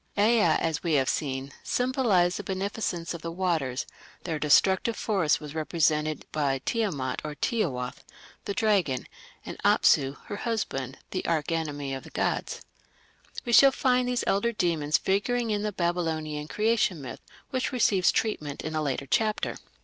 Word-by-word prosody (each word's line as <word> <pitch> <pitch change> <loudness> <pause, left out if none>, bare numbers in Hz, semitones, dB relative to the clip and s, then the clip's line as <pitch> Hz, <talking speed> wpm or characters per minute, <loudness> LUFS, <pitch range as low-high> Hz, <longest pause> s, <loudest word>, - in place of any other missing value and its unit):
Ea, 220 +3 +4
as 160 -2 +1
we 170 -3 0
have 135 -3 +3
seen, 135 -1 -2
symbolized 235 -9 +1
the 205 - -5
beneficence 190 -3 -3
of 170 - -7
the 165 - -4
waters; 165 -8 -1 0.4
their 160 -4 -3
destructive 190 +9 +3
force 190 -9 +1
was 150 -2 -8
represented 155 -1 0
by 140 -3 0
Tiamat 190 - -1
or 150 -1 -5
Tiawath, 145 - -2 0.4
the 200 - -3
dragon, 195 - +1 0.4
and - - -7
Apsu, 135 +1 +4
her 205 - -5
husband, 145 - -3
the 185 - -2
arch 160 -2 0
enemy 145 -4 -2
of 135 - -5
the - - -12
gods. - - -2 0.8
We 240 - -1
shall 275 +3 +8
find 250 -2 +2
these 250 -1 0
elder 200 +4 +1
demons 160 -7 +1
figuring 225 +4 0
in 205 -1 0
the 210 0 -1
Babylonian 160 -4 -2
Creation 215 -3 +1
myth, 135 -3 -8 0.3
which 260 -2 -1
receives 205 -7 +3
treatment 150 -10 -2
in 155 - -4
a 155 - 0
later 140 -2 -2
chapter. 215 - 0
170 Hz, 155 wpm, -27 LUFS, 150-215 Hz, 0.8 s, shall